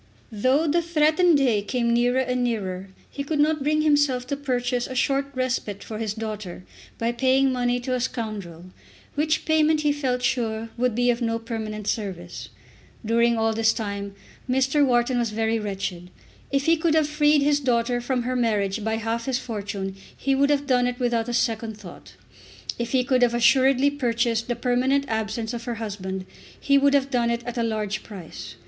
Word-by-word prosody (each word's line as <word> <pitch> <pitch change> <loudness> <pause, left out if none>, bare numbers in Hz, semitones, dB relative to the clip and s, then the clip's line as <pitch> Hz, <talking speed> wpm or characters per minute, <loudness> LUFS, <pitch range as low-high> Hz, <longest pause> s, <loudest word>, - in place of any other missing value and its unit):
Though 255 +8 +2
the 335 +3 +2
threatened 330 0 +3
day 245 -7 +2
came 235 +3 0
nearer 245 +2 +2
and 250 -1 -1
nearer 195 -5 -3 0.2
he 280 - -4
could 295 +1 -2
not 305 0 +2
bring 305 +2 +1
himself 290 -4 +2
to 280 - -2
purchase 250 -3 -1
a 260 - -7
short 275 +2 +1
respite 255 -6 -2
for 215 -1 -6
his 215 -2 -2
daughter 215 -5 -6 0.3
by 230 +1 0
paying 260 +2 +2
money 245 -1 0
to 255 +1 -2
a 255 - 0
scoundrel, 215 -9 -4 0.5
which 310 +1 0
payment 315 -1 +3
he 295 -1 +2
felt 260 -4 -1
sure 225 -3 -1
would 245 -2 0
be 245 +1 +3
of 240 +1 -3
no 230 -1 0
permanent 220 -2 -5
service. 185 -6 -4 0.6
During 235 +1 +3
all 225 0 +1
this 225 0 +3
time 200 -3 -5 0.3
Mr. 265 +3 +3
Wharton 245 -1 +2
was 235 -2 0
very 225 +1 0
wretched. 195 -4 -4 0.4
If 275 0 +1
he 330 0 +4
could 320 0 +1
have 310 -2 +3
freed 300 -1 +3
his 290 0 +3
daughter 245 -2 +1
from 250 0 -1
her 255 +1 -2
marriage 210 -4 0
by 220 +1 0
half 225 +1 -2
his 265 -2 0
fortune 200 -5 -5 0.2
he 275 - 0
would 280 +1 +3
have 290 -1 +1
done 250 -3 +2
it 250 +1 -4
without 240 -2 0
a - - -1
second 225 -2 -1
thought. 175 - -12 0.6
If 235 -1 -3
he 255 -1 +3
could 255 0 +1
have 240 -1 +3
assuredly 265 +3 +4
purchased 235 -4 0
the 240 - -1
permanent 255 +3 +1
absence 220 +1 -2
of 235 -1 -5
her 240 - -3
husband, 190 -4 -5 0.3
he 280 0 +3
would 280 0 +4
have 275 0 +1
done 240 -2 +1
it 235 0 -1
at 240 0 -4
a - - +2
large 215 -2 -2
price. 190 -7 -9
240 Hz, 190 wpm, -24 LUFS, 220-270 Hz, 0.6 s, he